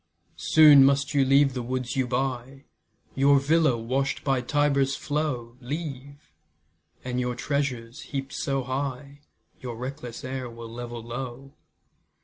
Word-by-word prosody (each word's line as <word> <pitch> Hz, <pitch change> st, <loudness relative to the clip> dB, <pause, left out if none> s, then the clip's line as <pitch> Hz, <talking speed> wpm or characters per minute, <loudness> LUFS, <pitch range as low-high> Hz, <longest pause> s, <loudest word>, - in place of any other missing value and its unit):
Soon 150 Hz, -3 st, +7 dB
must 140 Hz, +2 st, +2 dB
you 140 Hz, -1 st, +4 dB
leave 135 Hz, +1 st, +4 dB
the 125 Hz, -, -3 dB
woods 125 Hz, 0 st, -3 dB
you 130 Hz, -2 st, 0 dB
buy, 130 Hz, +1 st, -3 dB, 0.5 s
Your 140 Hz, +1 st, +4 dB
villa, 155 Hz, -2 st, +3 dB
wash'd 130 Hz, +4 st, -2 dB
by 135 Hz, -3 st, +1 dB
Tiber's 140 Hz, 0 st, +1 dB
flow, 135 Hz, -6 st, -3 dB
Leave, 140 Hz, 0 st, -7 dB, 0.7 s
and 125 Hz, 0 st, -2 dB
your 125 Hz, -1 st, -1 dB
treasures, 125 Hz, -3 st, -3 dB
heap'd 135 Hz, 0 st, -5 dB
so 135 Hz, -2 st, -1 dB
high, 135 Hz, +2 st, -4 dB, 0.4 s
Your 120 Hz, -2 st, -6 dB
reckless 125 Hz, 0 st, -7 dB
heir 130 Hz, -1 st, -4 dB
will 115 Hz, 0 st, -9 dB
level 120 Hz, -1 st, -6 dB
low. 125 Hz, +3 st, -7 dB
135 Hz, 130 wpm, -26 LUFS, 125-140 Hz, 0.7 s, Soon